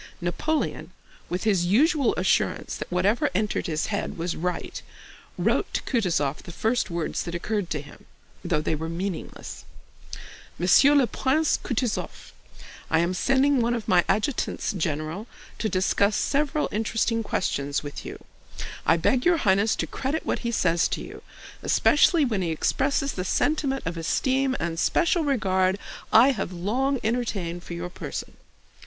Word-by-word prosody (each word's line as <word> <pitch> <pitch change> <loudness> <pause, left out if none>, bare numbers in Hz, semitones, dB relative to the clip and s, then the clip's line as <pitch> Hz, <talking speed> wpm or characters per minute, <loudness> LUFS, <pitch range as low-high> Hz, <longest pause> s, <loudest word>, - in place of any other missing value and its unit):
Napoleon, 295 - -2 0.4
with 180 +1 -2
his 190 -5 +2
usual 280 - +3
assurance - - 0
that - - -7
whatever 195 +6 +2
entered 210 +2 0
his 155 -1 -1
head 200 - -3
was 170 +1 -2
right, 180 +2 -3 0.6
wrote - - +1
to - - -1
Kutúzov 165 - 0
the - - -10
first 225 +6 0
words 170 -2 -2
that 170 - -5
occurred 205 +1 -2
to 150 - -2
him, 145 - -15 0.4
though 170 -4 0
they 155 - -1
were 160 +1 -3
meaningless. 180 +1 -5 0.9
MONSIEUR 235 - +5
LE 280 -3 +5
PRINCE 275 +7 +1
KOUTOUZOV: 245 -2 -3 0.6
I 160 - +3
am 170 +2 +1
sending 270 +7 +3
one 235 +1 +1
of 230 -3 -5
my 180 -2 +4
adjutants 215 +3 0
general 160 +3 -3 0.3
to 220 - 0
discuss 200 +2 +2
several 295 +1 0
interesting 225 +1 0
questions 145 -9 -1
with 145 -1 -7
you. - - -9 0.6
I 165 - +5
beg 250 +9 +2
your 350 -1 +4
Highness 200 -3 +2
to - - -1
credit 275 +4 -3
what - - -1
he 235 - -3
says 175 -7 +2
to - - -3
you, - - -9 0.4
especially 305 +1 +4
when 220 -6 -1
he 175 - -1
expresses 275 - 0
the 185 - -3
sentiment 270 +6 0
of 165 +1 -3
esteem 260 - +1
and 165 0 -2
special 340 - +2
regard 190 -9 +1 0.3
I 230 +5 +7
have 205 -7 -3
long 245 +10 0
entertained 205 -7 -2
for 170 - -7
your 175 +1 -5
person. - - -6
205 Hz, 155 wpm, -25 LUFS, 175-260 Hz, 0.9 s, I